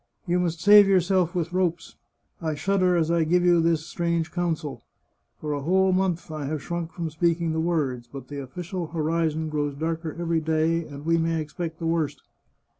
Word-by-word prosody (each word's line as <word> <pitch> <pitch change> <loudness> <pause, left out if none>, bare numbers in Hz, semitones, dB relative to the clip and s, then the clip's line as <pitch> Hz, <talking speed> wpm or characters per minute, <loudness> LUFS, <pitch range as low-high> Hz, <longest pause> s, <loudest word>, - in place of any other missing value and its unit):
" - - -46
You 175 -1 +1
must 170 -2 -1
save 205 +1 +8
yourself 185 -1 +2
with 175 0 -2
ropes. 180 -2 -1 0.5
I 160 -2 -1
shudder 185 +2 +2
as 165 -1 +1
I 170 -1 +3
give 175 +3 +2
you 175 -1 +5
this 165 -1 +1
strange 170 -1 -1
counsel. 165 -5 -2 0.6
For 150 -1 -3
a 145 - -3
whole 190 +5 +3
month 185 -3 0
I 155 -2 -4
have 150 0 -3
shrunk 170 -1 -4
from 165 -2 -4
speaking 170 +1 +1
the 160 - -1
words. 140 -8 -1
But 135 -1 -8
the 145 -1 -6
official 175 +6 -5
horizon 160 0 -1
grows 145 -2 -2
darker 160 +1 -3
every 170 -1 0
day, 160 +1 +1
and 145 0 -9
we 165 0 +3
may 165 0 0
expect 160 +2 -5
the 165 - -5
worst. 165 -2 -1
165 Hz, 190 wpm, -25 LUFS, 155-175 Hz, 0.6 s, save